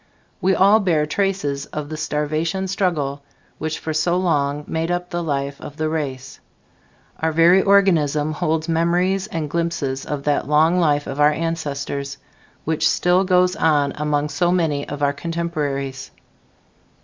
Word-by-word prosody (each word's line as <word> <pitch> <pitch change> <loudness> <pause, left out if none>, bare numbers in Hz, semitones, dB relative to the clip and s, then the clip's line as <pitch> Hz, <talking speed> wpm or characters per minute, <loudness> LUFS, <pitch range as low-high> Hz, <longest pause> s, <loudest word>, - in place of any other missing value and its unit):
We 190 +1 +3
all 200 +3 +5
bear 165 -7 +1
traces 155 -5 -1
of 150 -1 -6
the 155 - -5
starvation 155 +4 -2
struggle 155 -8 -1 0.4
which 160 0 -3
for 160 - -4
so 170 +3 +1
long 150 -5 0
made 165 +1 -2
up 175 +1 -2
the 175 -1 -2
life 140 -3 -3
of 150 - -9
the 155 0 -1
race. 135 -5 -4 0.8
Our 160 0 0
very 170 +4 +5
organism 160 -7 +3
holds 155 +1 -1
memories 175 +4 +1
and 160 -7 -3
glimpses 160 -4 -2
of 145 -2 -3
that 145 0 0
long 160 +4 +3
life 145 -4 +2
of 135 - -6
our 150 +1 +5
ancestors, 145 -3 -3 0.5
which 160 0 +1
still 180 +2 +2
goes 180 -1 +3
on 145 -7 +2
among 150 0 -1
so 175 +2 +1
many 160 -5 0
of 145 0 -4
our 140 0 +2
contemporaries. 145 -5 -3
155 Hz, 150 wpm, -21 LUFS, 145-175 Hz, 0.8 s, all